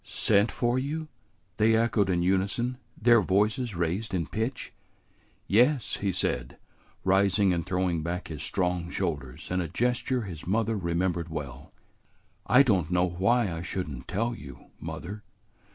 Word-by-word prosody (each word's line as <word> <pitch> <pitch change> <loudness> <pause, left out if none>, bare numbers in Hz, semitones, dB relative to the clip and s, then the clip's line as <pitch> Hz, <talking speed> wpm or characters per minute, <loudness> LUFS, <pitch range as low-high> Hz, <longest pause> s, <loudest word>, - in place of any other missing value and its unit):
"Sent 105 0 +2
for 120 +1 +1
you?" 155 +4 -3 0.5
they 110 +1 +4
echoed 110 -3 +2
in 85 -2 +1
unison, 100 +7 0 0.2
their 120 0 +6
voices 105 +4 +1
raised 90 +5 -1
in 85 -3 0
pitch. 115 - -3 0.7
"Yes," 125 +5 +3
he 100 -1 -1
said, 60 -8 -2 0.5
rising 95 0 +3
and 85 -1 -1
throwing 90 -2 0
back 85 +3 -3
his 75 -3 -6
strong 90 0 -1
shoulders 75 -6 -4
in 90 0 +1
a 85 - -2
gesture 120 - 0
his 85 -6 -8
mother 110 +3 +1
remembered 85 -2 -1
well. 70 -4 -7 0.8
"I 125 +7 +7
don't 95 - +2
know 90 0 +2
why 95 +3 +1
I 80 - -4
should 90 +1 -3
n't 65 -1 -8
tell 115 +6 -1
you, 70 -11 -11
mother. 80 +6 -6
95 Hz, 150 wpm, -28 LUFS, 85-115 Hz, 0.8 s, I